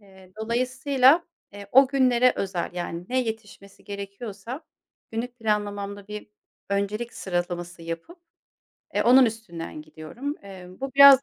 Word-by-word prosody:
Eee, 190 -2 -18
dolayısıyla, 260 +6 +3 0.3
eee, 200 0 -9
o 270 +1 +8
günlere 255 -2 +4
özel, 185 -3 -2
yani, 175 -1 -4
ne 255 +1 +2
yetişmesi 220 -4 -7
gerekiyorsa 200 - -7 0.5
günlük 240 +2 -4
planlamamda 205 -2 -2
bir 210 0 -6 0.4
öncelik 210 +4 -1
sıralaması 175 -1 -3
yapıp, 165 - -6 0.8
eee, - - +3
onun 255 +2 +7
üstünden 175 -9 -6
gidiyorum. 155 - -6
Eee, 190 -2 -10
bu 270 -1 -3
biraz 275 -1 +10
210 Hz, 125 wpm, -26 LUFS, 190-250 Hz, 0.8 s, biraz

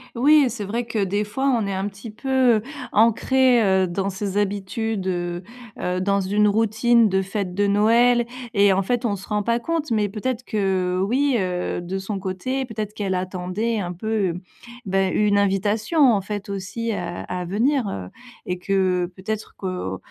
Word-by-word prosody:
Oui, 290 +5 +5
et - - +1
c'est 235 -3 -5
vrai 230 +5 -2
que 225 -3 -1
des 205 +2 0
fois 265 +7 -1
on 225 -4 0
est 200 - -2
un 190 +2 -2
petit 200 +3 -10
peu, 215 +5 -16
heu, 255 -4 +4 0.3
ancrés, 240 +3 +4
heu, 190 -2 +3
dans 190 +2 -2
ses 200 0 -3
habitudes, 205 0 -2
heu 175 -1 -2 0.3
heu, 180 0 -2
dans 200 +1 +1
une 205 +2 +2
routine 225 +2 +3
de 190 0 +2
fête 195 -1 -3
de 200 +2 +1
Noël 235 +4 +4 0.3
et 200 -2 +5
en 195 +1 +2
fait, 245 +5 -1
on 210 -4 0
se 195 - -11
rend 210 -1 -1
pas 235 +2 +1
compte, 310 +2 -2
mais 210 -2 +2
peut-être 230 +4 -3
que 190 -3 0
oui, 270 +5 +2
heu, 180 -3 -2
de 180 +2 -4
son 195 +2 -4
côté, 195 +8 -3
peut-être 215 -4 -5
qu'elle 200 -3 -2
attendait 185 +5 -2
un 180 -3 -3
peu, 195 -1 -1 0.5
bah, 195 0 +1
une 205 -1 +2
invitation 205 - +1
en 200 - +1
fait 205 +1 -5
aussi, 200 +4 -3
à 175 -3 -4
à 180 0 -4
venir, 235 +9 +1
heu, 95 - -5 0.4
et 180 - -2
que 185 -1 +1
peut-être 215 +3 -5
que, 180 - -4
205 Hz, 185 wpm, -23 LUFS, 190-230 Hz, 0.5 s, Oui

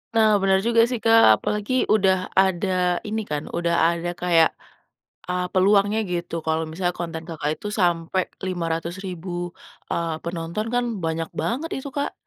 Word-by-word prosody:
Nah 220 -1 +5
benar 190 0 +4
juga 230 -1 +5
sih, 245 - -1
Kak, 225 0 +7 0.2
apalagi 210 +3 -2 0.2
udah 190 -3 +4 0.3
ada 190 0 0 0.4
ini 220 +1 -2
kan, 150 0 -1
udah 170 0 +1
ada 170 0 -2
kayak, 170 -2 +4 0.8
eee, 180 0 -1
peluangnya 200 +3 +3
gitu. 175 -1 -3
Kalau 160 0 0
misalnya 175 +2 -2
konten, 165 -1 -4
Kakak, 155 -3 -3
itu - - -7
sampai 175 +1 +1 0.3
500.000, 175 +1 -4 0.6
eee, 165 -2 -2
penonton, 170 +4 -3
kan 245 0 +2 0.2
banyak 165 0 -2
banget 250 - -2
itu, 270 +1 -6
Kak. 285 - -1
180 Hz, 145 wpm, -23 LUFS, 165-205 Hz, 0.8 s, Kak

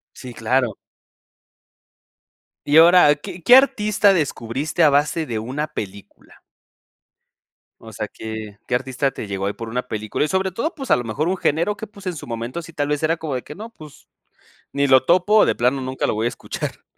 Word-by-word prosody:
Sí, 125 -2 -9
claro. 120 -1 0 1.9
Y 145 +2 +3
ahora, 165 -2 +7
¿qué 175 +4 -9
qué 245 +9 +7
artista 210 -6 +4
descubriste 145 -1 -1
a 155 - +7
base 150 +3 +1
de 115 -6 -3
una 135 +7 -3
película? 100 -5 -9 1.4
O 110 -1 -12
sea, 105 0 -5
¿qué 110 -2 -8
qué 125 - 0
artista 130 +2 -1
te 125 - -7
llegó 100 -1 -4
ahí 100 - -1
por 115 +1 -8
una 125 +2 -3
película? 110 +5 -2
Y, - - -2
sobre 190 +2 0
todo, 235 - -3
pues, 270 -3 -6
a - - +6
lo 120 - -4
mejor 145 +9 -2
un 190 - -1
género 170 +6 0
que, 220 - -7
pues, 200 -2 -15
en 180 - -2
su 150 - -9
momento, 120 +7 -5
sí, 165 0 -13
tal 145 -1 -2
vez 150 -1 -1
era 160 +1 +2
como 160 -4 -5
de 125 - -3
que 150 - -10
no, 220 +4 -8
pues, 155 -10 -15 0.6
ni 140 0 +1
lo 130 -1 +5
topo 185 +6 +3
o - - +6
de - - +1
plano 125 +3 +1
nunca 130 0 -3
lo - - 0
voy 110 +1 -2
a - - +2
escuchar. 120 - -6
145 Hz, 205 wpm, -21 LUFS, 120-175 Hz, 1.9 s, ahora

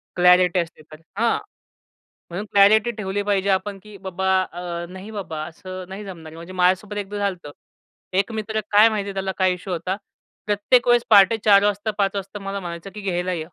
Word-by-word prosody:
Clarity 180 0 +5
असते 170 -2 -5
तर 155 +1 -12 0.2
हां. 230 +1 +2 0.9
म्हणून 190 +5 -5
क्लॅरिटी 215 +4 +5
ठेवली 205 -1 -2
पाहिजे 200 -1 0
आपण, 195 +1 0
की 210 -1 -12
बाबा 190 0 -3 0.2
अ, 175 0 -5
नाही 190 +4 -9
बाबा 180 -7 -5
असं 185 +2 -9
नाही 200 +2 -7
जमणार 165 -5 -9
आहे. - - -12
म्हणजे 170 +3 -10
माझ्यासोबत 185 +3 +1
एकदा 205 0 -4
झालं 200 -2 0
होतं. 145 - -8 0.7
एक 200 +3 0
मित्र 220 0 -3
काय 210 +2 +7
माहिती 200 -2 -3
त्याला 190 0 -2
काय 185 -1 +3
इश्यू 180 +1 -6
होता. 180 +3 -2 0.5
प्रत्येक 215 +4 +2
वेळेस 240 -1 +5
पहाटे 205 +1 +7
4:00 200 -1 +6
वाजता 205 +1 0
5:00 200 -1 +1
वाजता 200 +1 -5
मला 195 0 -4
म्हणायचं, 170 +1 -7
की 210 - -8
"घ्यायला 185 -1 -1
ये." 170 - -3
195 Hz, 190 wpm, -22 LUFS, 180-205 Hz, 0.9 s, काय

